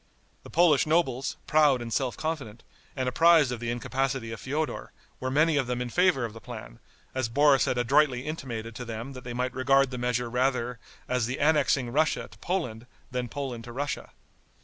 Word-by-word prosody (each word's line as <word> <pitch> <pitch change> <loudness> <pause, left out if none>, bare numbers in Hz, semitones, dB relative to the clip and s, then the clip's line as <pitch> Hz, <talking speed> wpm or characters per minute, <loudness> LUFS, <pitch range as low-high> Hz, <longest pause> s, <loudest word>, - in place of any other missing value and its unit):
The - - -13
Polish 160 -4 +4
nobles, 135 -5 +1
proud 150 -4 +4
and 115 -1 -5
self 130 -3 -1
confident, 140 -9 -4 0.3
and 130 -2 -1
apprised 160 0 +5
of 125 - -4
the 120 0 -3
incapacity 130 0 -2
of 115 - -6
Feodor, 150 +4 -3 0.3
were 130 - -2
many 155 +3 +3
of 135 -3 +1
them 125 0 -2
in 125 -1 -3
favor 180 -7 +3
of 110 - -7
the 115 - -11
plan, 110 - -9 0.3
as 130 -3 -1
Boris 145 +2 +4
had 125 - 0
adroitly 130 +1 +3
intimated 120 -7 -5
to 125 - -5
them 115 +4 -6
that 130 -1 -9
they 120 - -6
might 125 +1 -1
regard 135 +1 +3
the 125 - -4
measure 125 0 0
rather 125 -1 0 0.3
as 125 -3 0
the 125 - -3
annexing 145 -4 +2
Russia 155 +4 +1
to - - -16
Poland 125 -11 -3 0.2
than 125 -1 -3
Poland 130 -4 -5
to 120 - -8
Russia. 140 +4 -4
130 Hz, 195 wpm, -27 LUFS, 120-145 Hz, 0.3 s, apprised